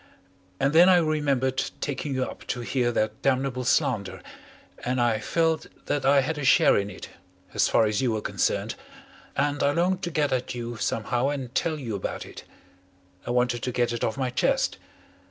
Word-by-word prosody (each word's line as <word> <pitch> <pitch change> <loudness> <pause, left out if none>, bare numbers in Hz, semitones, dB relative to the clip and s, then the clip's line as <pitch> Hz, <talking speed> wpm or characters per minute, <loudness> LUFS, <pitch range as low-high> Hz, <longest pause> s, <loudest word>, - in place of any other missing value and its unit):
And 140 +2 +1
then 175 +3 +7
I 185 - +7
remembered 140 -5 +1 0.2
taking 140 -1 -3
you 130 - +1
up - - -8
to 125 - -2
hear 120 0 0
that 110 -1 -1
damnable 130 -1 0
slander, 120 -5 0 0.6
and 125 +1 -1
I 120 -2 +2
felt 160 +7 0 0.2
that 140 -2 -1
I 140 0 +6
had 150 +3 -3
a - - -4
share 130 - +5
in 100 0 0
it, 100 - -9 0.4
as - - +3
far 115 - +3
as 105 +1 0
you 125 -3 +1
were 110 - -2
concerned, - - -1 0.6
and 145 0 0
I 140 - +3
longed 180 +3 +1
to 175 - -2
get 150 -4 0
at 125 -1 -2
you 120 0 -5
somehow 120 +4 -1
and 135 -4 -4
tell 160 0 0
you 120 -7 -5
about 95 - -4
it. - - -11 0.8
I - - -3
wanted 125 -1 +1
to 125 - -2
get 120 -1 0
it 120 - -3
off 110 - -1
my 130 -2 -1
chest. 125 - +1
130 Hz, 190 wpm, -26 LUFS, 120-145 Hz, 0.8 s, then